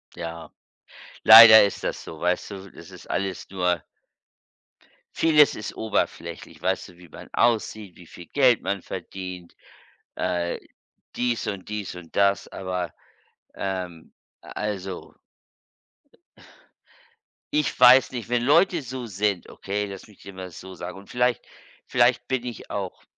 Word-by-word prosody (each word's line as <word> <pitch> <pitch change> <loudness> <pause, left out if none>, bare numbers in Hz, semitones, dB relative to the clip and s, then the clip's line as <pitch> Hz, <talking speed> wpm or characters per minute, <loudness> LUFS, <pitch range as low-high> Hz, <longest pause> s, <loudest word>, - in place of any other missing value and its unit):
Ja, 85 -1 -7 0.7
leider 110 0 +11
ist 100 - -5
das - - -3
so, 80 - -10
weißt 90 +4 -1
du? 95 -1 -9
Das - - -14
ist - - -13
alles 95 0 -3
nur 90 -4 -1 1.3
vieles 150 -3 +4
ist 105 - -7
oberflächlich, 110 -1 -3
weißt 95 +1 -1
du? 90 - -18
Wie 90 -1 -16
man - - -12
aussieht, 110 -4 0
wie 90 - -16
viel 85 - -13
Geld 130 -4 +3
man 100 -2 -3
verdient, 90 -2 -8 0.6
äh, 90 -1 -2 0.6
dies 120 -2 -1
und 100 -2 -5
dies 105 -4 -5
und 85 -2 -12
das, 100 0 +2
aber, 90 -4 -5 0.6
ähm, 90 -4 -5 0.3
also 95 -3 -6 2.4
ich 150 0 0
weiß 125 +1 +7
nicht, 120 -3 -6
wenn 120 -1 +1
Leute 170 +5 +3
so 130 0 -6
sind 100 -2 -2
okay, 105 +1 -4
lass 100 +1 -10
mich 105 - -20
dir 100 - -11
mal 95 -1 -8
so 95 +3 -11
sagen 90 +2 -8
und 100 - -17
vielleicht 125 -1 0 0.4
vielleicht 120 +1 +2
bin 130 -2 -2
ich 120 -4 -8
auch, 100 -3 -5
100 Hz, 135 wpm, -24 LUFS, 90-120 Hz, 2.4 s, leider